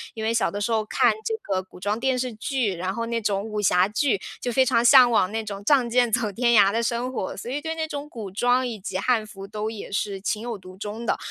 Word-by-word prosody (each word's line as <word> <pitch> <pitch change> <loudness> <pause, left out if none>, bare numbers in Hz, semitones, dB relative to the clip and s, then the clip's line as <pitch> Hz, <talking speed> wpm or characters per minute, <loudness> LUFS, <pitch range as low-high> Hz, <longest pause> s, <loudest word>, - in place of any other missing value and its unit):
因 220 - -6
为 225 - +1
小 230 - +1
的 205 - -4
时 205 - -1
候 220 -1 +1
看 215 - +2
这 455 - -2
个 190 -2 -1
古 185 - -16
装 205 +3 -1
电 260 +1 0
视 250 -1 -2
剧， 220 -2 -1
然 185 +2 -3
后 230 +2 -3
那 230 0 -2
种 200 -2 0
武 210 0 -4
侠 180 -2 +4
剧， 210 0 0 0.2
就 245 - -2
非 260 +2 +3
常 230 -1 +2
向 250 0 +8
往 195 -5 +2
那 225 +1 -2
种 200 -1 -6
仗 250 +1 +3
剑 245 -1 +2
走 225 -2 +1
天 235 +2 +2
涯 195 0 +4
的 230 - +1
生 245 +2 -2
活， 190 - -3
所 215 - -6
以 290 +3 -2
对 320 +1 -3
那 320 -1 -2
种 290 -1 -6
古 220 -8 -7
装 245 +5 +2
以 225 -3 -6
及 190 -1 -4
汉 225 +2 +1
服 195 -2 -10
都 215 +1 -4
也 220 -3 -8
是 200 -1 -2
情 210 +2 -2
有 235 -1 -4
独 185 -1 -13
钟 210 +3 -6
的。 - - +1
225 Hz, 290 characters per minute, -24 LUFS, 200-245 Hz, 0.2 s, 向